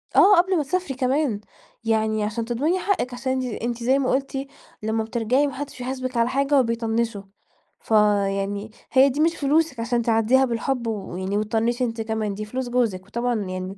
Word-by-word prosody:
آه، 410 Hz, +1 st, +7 dB
قبل 365 Hz, +1 st, +3 dB
ما 300 Hz, -, +1 dB
تسافري 360 Hz, -1 st, -2 dB
كمان، 260 Hz, -3 st, 0 dB, 0.4 s
يعني 220 Hz, -1 st, +1 dB
عشان 225 Hz, +2 st, -2 dB
تضمني 295 Hz, +10 st, 0 dB
حقِك 365 Hz, -12 st, -1 dB
عشان 260 Hz, +1 st, -2 dB
أنتِ 260 Hz, 0 st, -1 dB, 0.2 s
أنتِ 235 Hz, 0 st, -3 dB
زي 265 Hz, +3 st, +3 dB
ما 260 Hz, -, 0 dB
قُلتِ 270 Hz, 0 st, -2 dB, 0.4 s
لمّا 220 Hz, 0 st, 0 dB
بترجعي 235 Hz, +5 st, +1 dB
ما 275 Hz, -, -5 dB
حدش 285 Hz, -1 st, -7 dB
بيحاسبِك 255 Hz, 0 st, -4 dB
على 230 Hz, +1 st, +3 dB
حاجة 275 Hz, +1 st, +2 dB
وبيطنشوا. 230 Hz, -3 st, 0 dB, 0.6 s
فيعني 205 Hz, -1 st, +1 dB, 0.2 s
هي 270 Hz, +1 st, +6 dB
دي 280 Hz, +4 st, -4 dB
مش 330 Hz, +1 st, +3 dB
فلوسِك 290 Hz, -2 st, +1 dB
عشان 235 Hz, +1 st, 0 dB
تعدّيها 230 Hz, +3 st, +3 dB
بالحب 240 Hz, 0 st, -2 dB
و 210 Hz, -5 st, -4 dB
ويعني 190 Hz, +3 st, -2 dB
وتطنشي 225 Hz, +4 st, 0 dB
أنتِ 230 Hz, -1 st, -2 dB
كمان، 220 Hz, -2 st, -2 dB
دي 215 Hz, +1 st, -5 dB
فلوس 255 Hz, +3 st, -4 dB
جوزِك 220 Hz, -7 st, 0 dB
وطبعاً 240 Hz, +2 st, -1 dB
يعني 185 Hz, 0 st, -5 dB
235 Hz, 180 wpm, -23 LUFS, 220-270 Hz, 0.6 s, آه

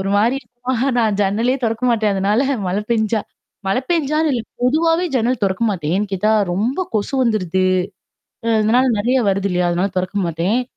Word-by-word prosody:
ஒரு 195 Hz, +1 st, -2 dB
மாரி 230 Hz, +6 st, +2 dB
இருக்குமா, 245 Hz, +2 st, -5 dB, 0.2 s
நான் 220 Hz, -3 st, +2 dB
ஜன்னலையே 225 Hz, +7 st, +1 dB
தொறக்க 225 Hz, +2 st, -1 dB
மாட்டேன், 215 Hz, -3 st, +1 dB
அதனால 205 Hz, +5 st, +1 dB, 0.3 s
மழை 200 Hz, +3 st, -1 dB
பெஞ்சா 220 Hz, -1 st, +1 dB, 0.5 s
மழை 195 Hz, +6 st, +1 dB
பெஞ்சான்னு 310 Hz, -1 st, +1 dB
இல்ல, 240 Hz, -, 0 dB, 0.2 s
பொதுவாவே 325 Hz, +6 st, +2 dB
ஜன்னல் 245 Hz, 0 st, +1 dB
தொறக்க 195 Hz, +3 st, 0 dB
மாட்டேன். 165 Hz, -5 st, -2 dB
ஏன் 205 Hz, +1 st, -1 dB
கேட்டா, 205 Hz, +3 st, +1 dB, 0.2 s
ரொம்ப 225 Hz, -, -1 dB
கொசு 215 Hz, +5 st, -1 dB
வந்துடுது. 190 Hz, -6 st, 0 dB, 0.8 s
அ -, -, -1 dB
அதனால 240 Hz, +5 st, +3 dB
நெறைய 245 Hz, +6 st, +1 dB
வருது 195 Hz, 0 st, 0 dB
இல்லையா? 180 Hz, -1 st, +1 dB
அதனால 180 Hz, +3 st, 0 dB
தொறக்க 185 Hz, +2 st, -2 dB
மாட்டேன். 170 Hz, +8 st, 0 dB
215 Hz, 165 wpm, -19 LUFS, 195-250 Hz, 0.8 s, அதனால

